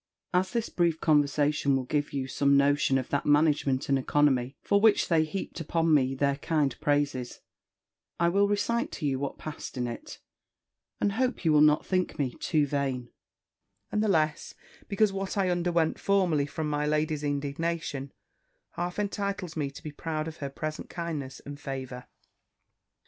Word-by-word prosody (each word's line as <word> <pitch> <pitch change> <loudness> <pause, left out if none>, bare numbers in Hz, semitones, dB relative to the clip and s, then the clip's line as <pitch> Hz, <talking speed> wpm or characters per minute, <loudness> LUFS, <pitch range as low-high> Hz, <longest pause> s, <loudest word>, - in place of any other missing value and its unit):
As 185 +1 +2
this 235 -2 -1
brief 170 -2 +1
conversation 145 -2 +2
will 135 - 0
give 145 +3 -1
you 135 -2 -2
some 140 +1 +3
notion 140 -1 +3
of 130 - -3
that 140 - 0
management 145 -3 +3
and 135 -1 +2
economy 135 -1 +1
for 200 0 +2
which 220 -1 +4
they 165 -2 +4
heaped 170 +5 -5
upon 165 0 +1
me 135 -2 +3
their 140 +1 +1
kind 145 -3 0
praises, 145 -4 0 0.8
I 170 - +3
will 200 +3 +3
recite 205 +3 0
to - - -4
you 135 -2 0
what 140 0 -4
passed 150 -3 -7
in 125 - -1
it, 120 -1 -7 0.8
and 200 - +1
hope 250 -2 -1
you 160 - +4
will 150 - +6
not 150 0 +5
think 185 -1 -1
me 130 -4 -1
too 155 -3 +1
vain; 135 -3 -2 0.8
and 210 - +1
the 215 - +1
less, 155 -4 0 0.3
because 205 0 +2
what 195 +1 -3
I 190 -2 +2
underwent 170 -2 +1
formerly 180 -8 +2
from 155 +1 -3
my 150 0 -1
lady's 150 0 0
indignation, 145 0 -2 0.6
half 175 +1 -4
entitles 200 -4 -3
me 145 -3 -1
to 140 - -12
be 150 - -6
proud 155 +1 -3
of 160 - -7
her 140 - -4
present 155 +2 -5
kindness 155 -6 -5
and 145 0 -8
favour. 130 -3 -6
150 Hz, 170 wpm, -28 LUFS, 140-175 Hz, 0.8 s, will